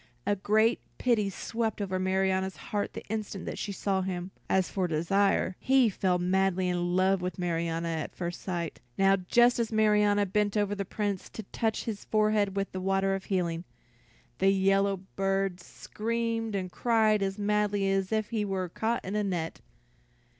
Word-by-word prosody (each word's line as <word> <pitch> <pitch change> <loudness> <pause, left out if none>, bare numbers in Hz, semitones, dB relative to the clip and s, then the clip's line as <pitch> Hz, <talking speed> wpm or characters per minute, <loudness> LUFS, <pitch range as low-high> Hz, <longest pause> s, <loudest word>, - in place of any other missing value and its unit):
A 205 - +2
great 215 +4 +2 0.2
pity 225 -5 +2
swept 225 +3 -3
over 190 -2 -2
Marianna's 190 0 +1
heart 205 -1 -3
the - - -7
instant 210 -2 -4
she 205 - -3
saw 195 -1 0
him; 185 0 -4 0.2
as 190 -1 +2
for 185 -2 -1
Desire, 185 +4 +1
he 260 -3 +4
fell 185 -2 +1
madly 185 +1 +1
in 175 0 0
love 190 0 +3
with 180 -2 -3
Marianna 170 -1 -1
at 160 -2 -4
first 175 -1 -4
sight. 175 -3 -4 0.2
Now 195 0 +5
just 240 +6 +3
as 230 -1 0
Marianna 210 -1 +3
bent 205 +2 0
over 205 -1 +1
the 200 -1 -3
Prince 200 -1 -3
to 220 - -7
touch 220 -1 -1
his 215 -3 -5
forehead 215 -2 +2
with 195 0 -1
the 185 - -4
water 195 +1 +1
of 195 0 -4
healing, 170 -3 -1 0.8
the 195 - +4
yellow 195 0 +3 0.2
bird 195 -1 0
screamed 225 +4 -3
and 185 -2 -3
cried 220 -2 +2
as 195 0 -1
madly 205 -1 +1
as 195 0 0
if 215 -1 0
he 220 -2 0
were 190 -3 -2
caught 225 +6 -2
in 190 +3 -3
a 210 - +1
net. 175 -5 -3
195 Hz, 170 wpm, -29 LUFS, 185-210 Hz, 0.8 s, Now